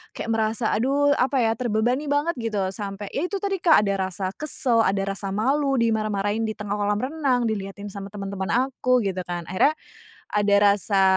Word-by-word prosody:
kayak - - -5
merasa 220 0 0
aduh 280 +5 +2
apa 270 +2 +1
ya, 225 - +2
terbebani 240 +4 0
banget 290 +4 +1
gitu, 220 -3 -2
sampai 200 0 -6
yaitu 360 +7 -1
tadi, 390 -2 -2
Kak, 320 - +5
ada 195 -1 0
rasa 185 +1 -3
kesel, 255 -6 +1
ada 195 -1 0
rasa 195 0 -5
malu 275 +5 +1
dimarah-marahin 215 -2 0
di 215 - -4
tengah 205 -1 -4
kolam 205 0 +1
renang, 260 -2 0
dilihatin 200 -2 -4
sama 195 -1 -6
teman-teman 195 -1 -5
aku 255 0 +2
gitu 190 -1 -2
kan, 175 -1 -4
akhirnya 235 +12 +2 0.6
ada 205 -1 +3 0.2
rasa, 200 -1 +1
220 Hz, 170 wpm, -24 LUFS, 200-260 Hz, 0.6 s, Kak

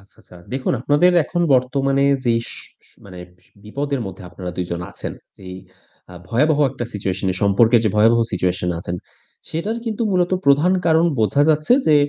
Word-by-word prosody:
আচ্ছা, 100 - -24
আচ্ছা। 90 - -17 0.2
দেখুন, 130 0 -1
আপনাদের 145 +7 +3
এখন 175 - -3
বর্তমানে 135 +2 +1 0.2
যেই 115 -1 +2
সু - - -2 0.2
সু - - -20
মানে 90 -2 -11 0.2
বি 90 - -31 0.2
বিপদের 140 +5 -3
মধ্যে 95 -1 -9
আপনারা 90 0 -7
২ 90 - -2
জন 85 0 -3
আছেন, - - -6 0.3
যেই 90 -1 -9 0.6
আ - - -11
ভয়াবহ 145 +8 +2
একটা 125 -2 -5
situation 95 -1 -3
এ - - -5
সম্পর্কের 110 +4 +4
যে 110 - +2
ভয়াবহ 115 +2 +4
situation 90 -1 -1
আছেন, 85 +1 -5 0.5
সেটার 205 +8 -3
কিন্তু 225 +1 -2
মূলত 180 0 +1
প্রধান 145 +6 +4
কারণ 160 0 +4
বোঝা 110 +6 +2
যাচ্ছে 155 +6 +2
যে, 155 - +5
125 Hz, 180 wpm, -20 LUFS, 95-150 Hz, 0.6 s, যে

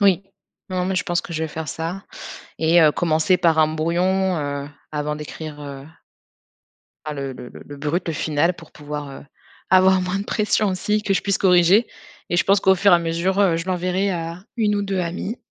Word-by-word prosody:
Oui, 195 -2 +4 0.5
non, 180 -1 -1
mais 190 - -1
je - - +1
pense 175 -2 0
que 170 - -9
je 160 - -2
vais 160 - -2
faire 155 0 -6
ça 165 +6 -4 0.6
et, 160 +2 +4
heu, 155 - +6
commencer 170 +4 +2
par 165 -2 +2
un 155 - +5
brouillon, 175 +4 0
heu, 145 -1 -4 0.2
avant 150 0 -2
d'écrire, 150 0 -8
heu 140 -1 -8 1.2
a 155 -1 -4
le 140 -2 -4
le 125 -1 -9
le - - -12
le 145 - -9
brut, 155 +5 -2
le 165 - -2
final 155 +3 +1
pour 165 -2 -14
pouvoir, 150 -1 -7
heu, 135 - -11 0.4
avoir 185 0 +5
moins 185 +2 -2
de - - -4
pression, 215 -1 +1
aussi. 210 +3 -1
Que 200 - 0
je - - +1
puisse 200 -1 +1
corriger. 185 +4 +4 0.4
Et 175 - +1
je - - +3
pense 195 0 +4
qu'au 190 -1 +5
fur 200 +2 +4
et - - +9
à - - +5
mesure, 170 +4 0
heu, 180 -5 +3
je 170 - -4
l'enverrai 185 +2 0
à 170 +2 -5
1 210 -2 +1
ou 205 - 0
2 195 -2 -1
amies, 180 +6 -4
175 Hz, 215 wpm, -22 LUFS, 155-190 Hz, 1.2 s, et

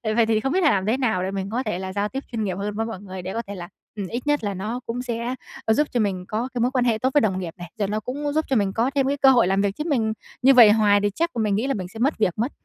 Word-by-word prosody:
Vậy 235 - +4
thì 220 -1 +2
không 270 +4 -1
biết 375 - +2
là 305 - +6
làm 190 -1 0
thế 225 +5 +1
nào 220 -9 0
để 190 - -2
mình 195 0 -3
có 245 +4 -2
thể 210 -6 -3
là 190 0 -5
giao 205 +1 -1
tiếp 270 +1 -5
chuyên 225 -2 -2
nghiệp 185 -3 -2
hơn 205 +1 -3
với 225 +1 -1
mọi 225 -5 -6
người 190 -2 -7
để 185 +2 -5
có 230 - -2
thể 200 - -6
là 175 -1 -7 0.3
ừm, 200 -3 -4
ít 240 +7 -5
nhất 295 -5 +1
là 200 -1 -1
nó 215 +6 -4
cũng 240 +2 -3
sẽ, 240 +1 -3 0.3
ơ, 220 - +4
giúp 295 +5 +2
cho 245 - 0
mình 190 -4 -1
có 230 +5 -2
cái 240 - -2
mối 245 - +2
quan 255 -2 +1
hệ 225 -2 +2
tốt 260 +3 +1
với 290 - +5
đồng 190 -5 0
nghiệp 170 -3 -5
này. 175 -1 -9
Rồi 200 - +1
nó 210 +1 -1
cũng 285 +6 -4
giúp 315 +1 +1
cho 265 - +2
mình 200 -3 +1
có 240 +4 +1
thêm 270 -1 +2
cái 285 +1 0
cơ 270 -1 +6
hội 240 -7 +4
làm 195 +1 +2
việc, 200 -1 0
chứ 300 - -2
mình 225 -7 +1 0.3
như 270 +2 +6
vậy 235 -4 +9
hoài 210 -2 +4
thì 205 - +2
chắc 335 +1 +1
mình 210 -3 +1
nghĩ 235 +6 0
là 275 - +1
mình 185 -4 -4
sẽ 220 +5 -11
mất 275 +5 +1
việc 195 -5 +1
mất. 240 +6 -1
220 Hz, 350 wpm, -23 LUFS, 200-255 Hz, 0.3 s, vậy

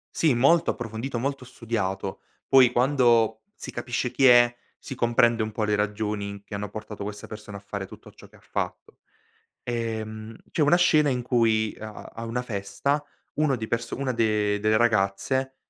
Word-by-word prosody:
Sì, 160 -4 +3
molto 160 +8 +4
approfondito, 120 +2 -5
molto 135 +1 -3
studiato. 100 -6 -3 0.3
Poi 130 -2 +6
quando 120 -4 +3
si - - -8
capisce 120 +1 -2
chi 135 - +2
è, 120 -1 +7 0.3
si 135 - -8
comprende 120 -1 +3
un 110 - -4
po' 110 0 -2
le 105 0 +1
ragioni 105 -1 -2
che 100 - -8
hanno 100 0 -4
portato 105 0 -7
questa 105 0 -7
persona 105 -2 -9
a - - -10
fare 100 0 -6
tutto - - -14
ciò - - -16
che - - -22
ha - - -22
fatto. - - -5 0.7
Ehm, 110 -2 -4
c'è 155 - 0
una 150 +4 +5
scena 155 -4 +4
in 125 -2 0
cui 115 -3 +2
a 110 0 -7
a - - -11
a 115 - -5
una 115 +2 -2
festa, 125 +6 -2 0.3
uno 150 -2 +2
di 110 -2 -5
perso 115 0 -2
una 135 -2 -1
de 105 -3 +1
delle 110 +1 +3
ragazze, 120 +4 +1
115 Hz, 180 wpm, -25 LUFS, 105-125 Hz, 0.7 s, è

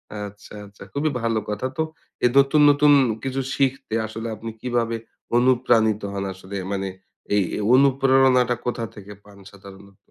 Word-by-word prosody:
আচ্ছা, 105 0 -9
আচ্ছা 100 0 -14
খুবই 150 +2 0
ভালো 115 -1 0
কথা 105 +4 -3
তো - - +1 0.4
এই 125 - +5
নতুন, 140 +2 +5
নতুন 145 +1 +5 0.3
কিছু 135 0 -2
শিখতে 135 -4 -1
আসলে 110 +1 -6
আপনি 115 +2 -7
কিভাবে 120 -2 -1 0.4
অনুপ্রাণিত 120 -4 +3
হন 100 0 -3
আসলে? 95 +2 -10 0.2
মানে 95 -1 -2 0.5
এই, 100 - +3 0.2
এই - - -3
অনুপ্রেরণাটা 130 -2 +4
কোথা 120 -1 -2
থেকে 105 0 -11
পান 100 -1 -17
সাধারণত? 100 0 -15
115 Hz, 150 wpm, -22 LUFS, 105-135 Hz, 0.5 s, এই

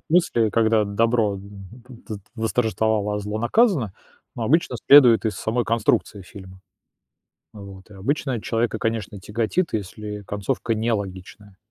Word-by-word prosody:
смысле, 120 -10 +2
когда 110 -1 +2
добро 110 +1 +1
в - - -7
в 105 +5 -13
дс - - -11 0.2
восторжествовало, 110 -2 0
а - - -2
зло 105 +1 -4
наказано, 130 - +2 0.4
ну, 120 - -4
обычно 145 +2 +1
следует 125 -6 +7
из 110 - -1
самой 115 +1 -1
конструкции 110 -3 0
фильма. 95 0 -13 0.9
Вот. 100 -2 -11
И - - -13
обычно 130 +4 -2
человека, 115 -1 -1
конечно, 110 -3 -3
тяготит, 115 - -1
если 105 0 -5
концовка 110 +3 -2
нелогичная. 100 -2 -4
110 Hz, 135 wpm, -23 LUFS, 100-120 Hz, 0.9 s, следует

